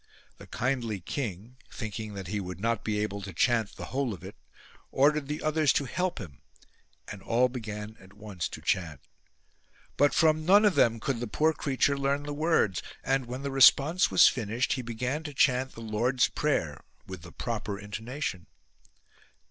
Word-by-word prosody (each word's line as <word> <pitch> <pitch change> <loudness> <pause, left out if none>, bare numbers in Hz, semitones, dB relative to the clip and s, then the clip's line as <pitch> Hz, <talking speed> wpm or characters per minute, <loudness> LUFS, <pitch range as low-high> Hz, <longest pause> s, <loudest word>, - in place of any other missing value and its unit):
The - - -12
kindly 120 -5 -2
king 110 +3 -5
thinking 110 -2 -6
that 95 -1 -6
he 105 +4 -3
would 90 -2 -6
not 115 +1 -1
be 110 -1 -1
able 105 -1 -2
to 95 0 -7
chant 115 +4 +1
the - - -7
whole 130 -5 -1
of 85 - -16
it 95 +2 -9 0.5
ordered 145 +1 +2
the 150 +1 -4
others 155 -1 +3
to 140 - 0
help 180 +8 -2
him 80 - -9 0.7
and 105 -2 -8
all 125 +4 +2
began 110 -3 -6
at 95 0 -17
once 100 -4 -5
to - - -9
chant. 80 -6 -1 1.0
But 145 +1 +3
from 155 -1 +3
none 200 +6 +6
of 205 - +4
them 115 -6 +3
could 130 0 -2
the 120 - -3
poor 155 +9 +2
creature 140 -1 +1
learn 140 +1 0
the 145 0 -5
words, 150 - +1 0.2
and, 135 -2 0
when 125 +3 -6
the 140 - -3
response 140 +5 +5
was - - +7
finished, 120 +1 0
he 130 - -3
began 125 +5 -3
to 150 -3 -8
chant 130 -1 +2
the 115 - -10
Lord's 115 +4 +1
Prayer - - -1 0.2
with 95 -3 -8
the 85 +2 -12
proper 110 -4 -4
intonation. 105 - -5
120 Hz, 180 wpm, -28 LUFS, 105-140 Hz, 1.0 s, was